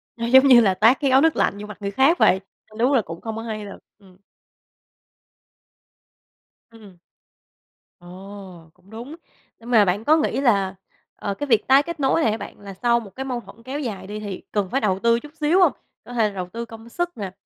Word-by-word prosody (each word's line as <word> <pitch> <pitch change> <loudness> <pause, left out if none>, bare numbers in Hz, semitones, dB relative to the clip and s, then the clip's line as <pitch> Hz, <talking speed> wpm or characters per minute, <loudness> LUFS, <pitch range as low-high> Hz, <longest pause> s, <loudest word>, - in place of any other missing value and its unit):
Nó 230 - -4
giống 265 +3 +6
như 250 -3 +8
là 195 -4 +3
tát 225 +7 +4
cái 280 -3 +1
gáo 265 +1 +5
nước 325 0 +3
lạnh 200 - 0
vô 210 - -8
mặt 210 - -10
người 200 0 -3
khác 270 - +3
vậy, 190 - +4 0.3
ơ, 215 0 -16
đúng 250 +4 +2
là 255 - +4
cũng 165 -2 -9
không 220 -1 -5
có 225 - -5
hay 215 -2 -6
thật, 200 - -9 0.2
ừm. 185 -2 -21 2.5
Ừm. 210 -5 -16 1.0
Ồ! 185 -1 -12
Cũng 190 - -26
đúng, 235 +8 -9 0.4
nhưng 235 +1 -12
mà 215 -4 +6
bạn 195 +4 -1
có 310 +2 +5
nghĩ 300 -3 -1
là, 200 -7 +1 0.4
ờ, 200 - -4
cái 290 +8 -5
việc 225 -5 +2
tái 270 +2 +6
kết 340 -1 -7
nối 270 +4 +2
này 225 - +2
á 220 - -2
bạn, 200 - -10
là 200 -1 -10
sau 235 +4 +1
một 205 -4 -13
cái 265 - -4
mâu 250 -2 -3
thuẫn 225 +3 -16
kéo 270 +3 -5
dài 205 -9 -5
đi, 210 +1 -6
thì 200 -3 -6
cần 200 -3 -1
phải 270 - -1
đầu 190 -2 0
tư 235 +1 +2
chút 295 +2 -13
xíu 320 +5 +2
hông? 355 -6 +5 0.3
Có 245 - -10
thể 225 -3 +2
là 205 - -12
đầu 180 -2 -4
tư 230 +4 -6
công 225 0 -13
sức 350 +5 -4
nè, 195 -4 -5
225 Hz, 230 wpm, -22 LUFS, 200-265 Hz, 2.5 s, như